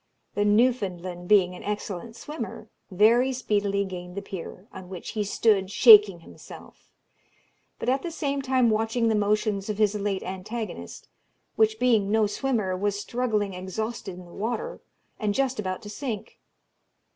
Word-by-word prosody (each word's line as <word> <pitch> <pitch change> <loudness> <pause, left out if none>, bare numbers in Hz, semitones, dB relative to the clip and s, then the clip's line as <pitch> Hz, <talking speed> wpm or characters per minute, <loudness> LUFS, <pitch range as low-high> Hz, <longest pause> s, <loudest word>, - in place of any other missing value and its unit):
The 205 - +1
Newfoundland 195 -6 +1
being 185 -3 +4
an 180 - -10
excellent 210 +1 -5
swimmer, 300 +5 -7 0.2
very 225 +7 +4
speedily 205 -5 0
gained 180 -1 -8
the 200 - -4
pier, 190 +1 -8
on 185 -1 -10
which 185 -2 -7
he 215 -2 -1
stood 200 -1 +2
shaking 210 -4 +7
himself; - - -14 0.9
but - - -6
at 265 +2 +2
the 345 - -4
same 280 -4 -2
time 260 -3 +2
watching 225 +2 +1
the - - +2
motions 210 -1 0
of 210 - -2
his 210 -1 +3
late 205 -2 -2
antagonist, 190 - -6 0.5
which, 220 0 +3
being 225 -5 +2
no 220 0 +3
swimmer, 210 -3 -1
was 200 +1 -1
struggling 215 -3 -1
exhausted 190 +2 -5
in 180 - -11
the 175 - -15
water, 240 - -4 0.4
and 210 -2 -1
just 265 -3 0
about 185 +1 -3
to 205 - -8
sink. 225 -4 -6
210 Hz, 155 wpm, -26 LUFS, 190-230 Hz, 0.9 s, shaking